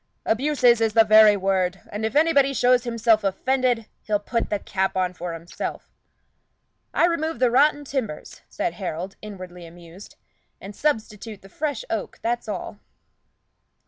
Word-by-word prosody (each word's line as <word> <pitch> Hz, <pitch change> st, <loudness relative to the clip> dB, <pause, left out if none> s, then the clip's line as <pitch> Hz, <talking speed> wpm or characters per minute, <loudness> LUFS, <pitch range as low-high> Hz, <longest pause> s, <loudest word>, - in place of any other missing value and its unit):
Abuses 245 Hz, -1 st, +3 dB
is 220 Hz, -1 st, +1 dB
the 225 Hz, 0 st, +6 dB
very 215 Hz, -1 st, +6 dB
word; 190 Hz, -1 st, 0 dB
and 210 Hz, +2 st, -5 dB
if 220 Hz, -, -8 dB
anybody 285 Hz, -3 st, +3 dB
shows 250 Hz, 0 st, +3 dB
himself 230 Hz, -2 st, +2 dB
offended, 245 Hz, +4 st, 0 dB, 0.2 s
he'll 210 Hz, -1 st, 0 dB
put 230 Hz, +3 st, -2 dB
the 205 Hz, -, 0 dB
cap 190 Hz, -1 st, -2 dB
on 180 Hz, -1 st, 0 dB
for 175 Hz, -1 st, -6 dB
himself." 165 Hz, +1 st, -7 dB, 1.0 s
"I -, -, +3 dB
remove 325 Hz, -3 st, -1 dB
the 250 Hz, 0 st, +2 dB
rotten 290 Hz, +3 st, +3 dB
timbers," 255 Hz, -, -5 dB
said -, -, -2 dB
Harold, 185 Hz, 0 st, -5 dB
inwardly 185 Hz, -4 st, -9 dB
amused, 170 Hz, +3 st, -14 dB, 0.4 s
"and 200 Hz, +1 st, -10 dB
substitute 215 Hz, -7 st, -3 dB
fresh 290 Hz, -5 st, -3 dB
oak, 220 Hz, -3 st, -3 dB
that's 240 Hz, +1 st, -2 dB
all." -, -, -5 dB
220 Hz, 145 wpm, -23 LUFS, 190-255 Hz, 1.0 s, the